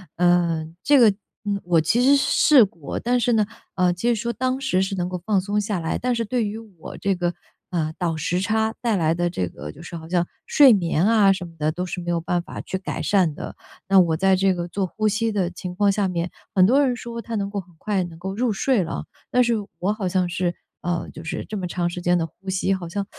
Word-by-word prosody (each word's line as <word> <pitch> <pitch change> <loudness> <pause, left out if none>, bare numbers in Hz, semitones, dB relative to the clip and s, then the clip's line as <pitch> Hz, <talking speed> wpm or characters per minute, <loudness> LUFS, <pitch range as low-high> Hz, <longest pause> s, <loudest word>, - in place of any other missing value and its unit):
呃， 175 -2 +2 0.2
这 290 -1 +5
个， 230 -3 +7 0.4
嗯， 200 -1 -1
我 170 -2 +3
其 225 +10 +2
实 275 +2 +6
是 275 - +2 0.4
试 - - +7
过， 165 -7 -6
但 245 +1 +1
是 240 0 +2
呢， 215 -2 +3 0.3
呃， 180 -1 +3
其 230 +7 -1
实 235 - +3
说 235 +2 -2
当 255 +3 -1
时 190 -9 +1
是 190 +1 -1
能 180 -2 -1
够 180 -1 -5
放 205 -1 +2
松 205 +2 -1
下 205 -3 -2
来， 165 0 -2
但 250 0 0
是 230 0 -1
对 235 +2 0
于 210 +1 -4
我 205 -8 -11
这 195 -1 0
个， 175 -1 -1 0.4
呃， 160 -3 -1
倒 175 -3 -1
时 165 +3 -1
差 220 +3 0
带 230 -3 +1
来 165 -3 +2
的 175 +1 0
这 90 - -2
个， 75 -3 -8
就 160 - -14
是 175 - -8
好 160 - -10
像 175 0 +1 0.2
睡 280 -3 +7
眠 170 -3 +1
啊 210 -3 +5
什 185 -1 -5
么 165 - -12
的， 155 0 0
都 180 +3 -3
是 180 - -5
没 175 - -5
有 170 - 0
办 175 +1 0
法 - - -8
去 190 - -4
改 190 - -5
善 185 -6 +2
的。 - - -7 0.3
那 195 -1 +7
我 165 -3 +3
在 190 +1 +4
这 190 0 +3
个 175 -1 -4
做 190 +2 -2
呼 215 +4 -1
吸 220 +2 0
的 190 -4 0
情 180 0 -7
况 200 +1 +3
下 200 0 0
面， 175 -1 -2 0.3
很 185 - +6
多 265 +8 +4
人 250 - 0
说 235 -1 -6
他 230 0 -5
能 200 -1 -1
够 200 -1 -3
很 175 -2 -12
快 200 0 -1
能 170 -2 -8
够 190 +2 -4
入 235 -1 +1
睡 235 0 +1
了， 165 - -5 0.3
但 250 0 +4
是 235 0 +2 0.3
我 200 +4 +1
好 205 -4 -3
像 180 -1 +1
是， 175 -1 -1 0.3
呃， 175 -1 -2
就 160 - -10
是 160 - -4
这 215 - -5
么 185 - -3
长 175 0 -1
时 175 +1 -6
间 175 0 +2
地 165 - 0
呼 190 +5 -11
吸， 190 +1 +1
好 180 -3 -4
像， 200 +3 -3
190 Hz, 280 characters per minute, -23 LUFS, 175-215 Hz, 0.4 s, 个